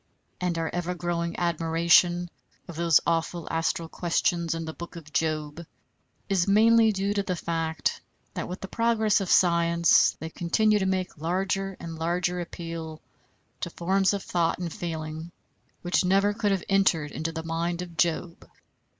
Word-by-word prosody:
And 180 -2 -1
our 165 -1 -2
ever 175 0 -2
growing 170 -1 -2
admiration 170 +1 +3 0.4
of 170 - -8
those 170 -1 +4
awful 165 0 -1
astral 165 0 -1
questions 170 0 0
in 165 0 -4
the 160 - -6
Book 170 +2 -9
of 155 -2 -11
Job, 155 0 -1 0.6
is 195 -2 +1
mainly 220 +2 +5
due 200 0 -1
to 205 - 0
the 185 -2 -2
fact 165 -1 -2 0.3
that, - - -4
with 180 +2 -7
the 195 - -5
progress 220 -1 +2
of 190 - -3
science, 170 -1 +4
they 160 0 -6
continue 210 +6 +2
to 190 - 0
make 185 -4 -2
larger 190 +3 -1
and 165 -1 -7
larger 175 +2 0
appeal 165 -2 -7 0.6
to - - -3
forms 190 +3 +1
of 200 -1 -3
thought 170 -1 0
and 175 -2 -4
feeling 160 -1 -5 0.5
which 175 +1 +2
never 195 +3 +3
could 210 -1 0
have 195 -2 0
entered 180 -6 +2
into 165 +1 -3
the 160 0 -5
mind 170 +2 -2
of 170 -2 -11
Job. 170 +1 -1
170 Hz, 160 wpm, -26 LUFS, 165-190 Hz, 0.6 s, mainly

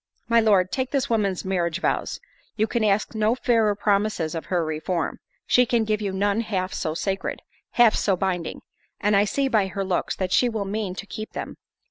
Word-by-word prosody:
My 235 0 +4
Lord, 200 -5 +3
take 260 -1 -1
this 270 -4 -1
woman's 200 -5 0
marriage 175 -2 0
vows—you 215 +2 -3
can 230 0 -1
ask 210 +1 +1
no 220 +1 +2
fairer 225 -5 +2
promises 200 -5 0
of 165 - -4
her 175 -3 0
reform—she 180 - -1
can 235 -1 +2
give 215 -1 -1
you 200 -2 -1
none 200 +3 +1
half 190 -4 -2
so 155 -2 -2
sacred, 195 +3 -3 0.3
half 240 -3 +6
so 195 - +1
binding; 180 -3 -2 0.4
and 210 0 +2
I 200 +1 +5
see 275 +7 0
by 215 -6 +2
her 195 +1 -3
looks 185 -2 -1
that 185 -1 -2
she 245 - +4
will 220 -3 -3
mean 200 -2 -3
to 195 - -6
keep 215 +1 -7
them. - - -5
205 Hz, 190 wpm, -24 LUFS, 185-220 Hz, 0.4 s, half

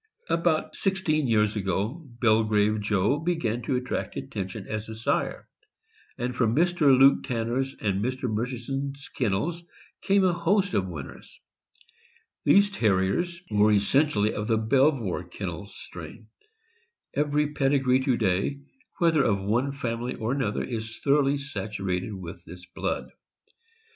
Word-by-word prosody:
About 165 -2 +1
sixteen 170 -7 0
years 105 -2 +2
ago, 105 - -2 0.2
Belgrave 110 -2 +3
Joe 105 +6 +1
began 150 -9 -1
to 125 +3 -1
attract 125 0 -3
attention 95 +1 -5
as 110 0 -4
a 110 - -6
sire, 110 - -1 0.7
and 125 +1 -3
from 115 -3 +1
Mr. 160 -4 +4
Luke 135 +1 +6
Tanner' 120 +1 -1
s 135 0 -2
and 100 -2 0
Mr. 130 +2 -3
Murchison's 130 +5 -3
kennels 130 - -1 0.4
came 195 0 +3
a 185 -2 +3
host 185 +3 +1
of 95 -2 +1
winners. 70 -6 -9 1.0
These 200 +1 +5
Terriers 125 - 0
were 105 +1 +4
essentially 105 +1 +2
of 105 0 -3
the 115 - +2
Belvoir 125 - +2
Kennels - - -7
strain. 110 -1 -10 0.8
Every 150 0 +1
pedigree 135 -2 +2
to 130 -4 +2
day, 100 +7 0 0.4
whether 165 -4 +3
of 100 -5 +2
one 115 +8 0
family 120 -2 -3
or 110 +1 -2
another, 135 -6 -1
is 110 -2 -5
thoroughly 140 0 +2
saturated 100 -7 -3
with 85 -2 -8
this 90 +1 -11
blood. - - -4
120 Hz, 135 wpm, -26 LUFS, 105-145 Hz, 1.0 s, Luke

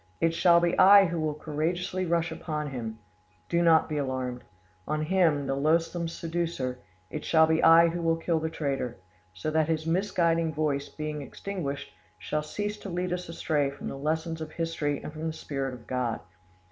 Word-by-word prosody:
It 165 0 +2
shall 170 0 +5
be 175 0 +1
I 200 +1 +9
who 170 -1 -2
will 155 -1 -1
courageously 175 +5 -2
rush 170 0 +1
upon 150 -3 -4
him 115 -4 -5 0.5
(do 170 - +2
not 165 -2 +5
be 150 -2 -2
alarmed), 130 -2 -3 0.4
on 155 0 -1
him, 160 -4 +2
the 135 - -1
loathsome 165 +4 +1
seducer; 165 -6 -3 0.3
it - - -5
shall 160 -1 +5
be 160 0 +2
I 165 +1 +8
who 170 +1 -3
will 165 -1 +2
kill 165 0 0
the 160 0 -2
traitor, 135 -6 -3 0.4
so 95 +12 -3
that 155 -1 +2
his 160 -1 -1
misguiding 165 -2 +1
voice, 145 -2 -1
being 155 -1 -5
extinguished, 145 -2 -5 0.2
shall 150 - -2
cease 205 +7 -4
to 195 - -7
lead 180 0 -2
us 180 -1 -4
astray 150 -4 0
from 140 +1 -7
the - - -5
lessons 160 +3 -2
of 155 0 -6
history 165 -3 -2
and 155 - -7
from 160 +1 -4
the 160 - -2
Spirit 135 -4 -4
of 120 - -14
God. 125 -3 -1
160 Hz, 185 wpm, -28 LUFS, 145-170 Hz, 0.5 s, I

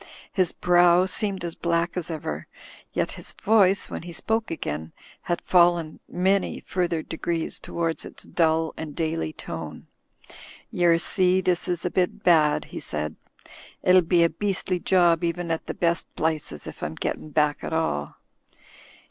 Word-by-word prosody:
His 185 -4 +2
brow 175 0 +4
seemed 190 -1 -1
as 170 - -4
black 170 0 0
as 180 -2 -3
ever, 160 -1 -4 0.4
yet - - -1
his - - -9
voice, 200 -3 +3
when - - -6
he 175 +1 -8
spoke 220 +6 -1
again, 80 - -4 0.3
had 175 - -1
fallen 175 -3 +3
many 190 +2 +1
further 170 -3 -1
degrees 165 0 -2
toward 165 -1 -2
its - - -10
dull 160 -1 +1
and 155 -2 -7
daily 165 -1 -1
tone. 80 - -7 0.9
•'"iTer 170 -1 +4
see, 185 +1 +3
this 180 -2 0
is 175 -1 -2
a 180 - 0
bit 180 -1 0
bad," 155 -4 +4
he - - -7
said. 75 0 -4 0.7
"It'll 185 0 +6
be 170 0 +3
a 170 - +4
beastly 185 +1 -1
job 175 -2 +3
even 170 0 -1
at 165 - -3
the - - -4
best 170 -1 0
plices, 155 - -2
if - - -9
I'm 80 - -3
gettin' 155 - -4
back 150 0 +1
at - - -4
all." 160 - -1
170 Hz, 155 wpm, -25 LUFS, 160-180 Hz, 0.9 s, It'll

